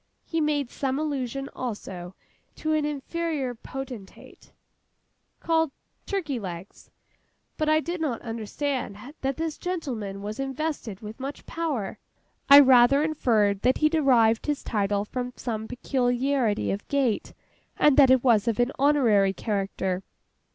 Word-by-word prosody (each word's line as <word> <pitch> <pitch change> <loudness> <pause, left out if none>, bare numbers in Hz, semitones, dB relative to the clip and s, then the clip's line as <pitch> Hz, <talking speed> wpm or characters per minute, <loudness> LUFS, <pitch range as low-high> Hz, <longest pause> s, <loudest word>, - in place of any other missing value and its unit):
He 325 -1 -1
made 290 -4 0
some 270 -1 -2
allusion, 275 -3 -2
also, 190 -7 -6 0.4
to 315 0 -1
an 305 -1 +1
inferior 295 -2 -2
potentate, 245 -4 -9 0.9
called 325 -1 +1 0.4
'Turkey 320 - -2
legs;' 185 -2 -8 0.7
but 310 0 0
I 310 0 +4
did 345 +1 -4
not 275 -7 -1
understand 230 +1 -3 0.2
that 270 0 -1
this 320 -1 -3
gentleman 240 - -4
was 210 +3 -5
invested 270 -6 -3
with 215 +3 -9
much 275 +2 -6
power. 300 -12 -3 0.5
I 280 +1 +11
rather 265 +1 +6
inferred 220 -10 +1
that 255 +2 +3
he 305 - +3
derived 245 -8 +3
his 295 -1 -1
title 205 -1 0
from 250 +2 -4
some 220 -3 -4
peculiarity 250 -2 0
of 200 +1 -4
gait, 270 -6 0 0.4
and 295 -2 +5
that 275 -3 +7
it 260 -1 +5
was 230 -4 +4
of 230 0 0
an 245 +2 +2
honorary 235 -9 +4
character. 195 -3 -2
260 Hz, 135 wpm, -26 LUFS, 215-295 Hz, 0.9 s, I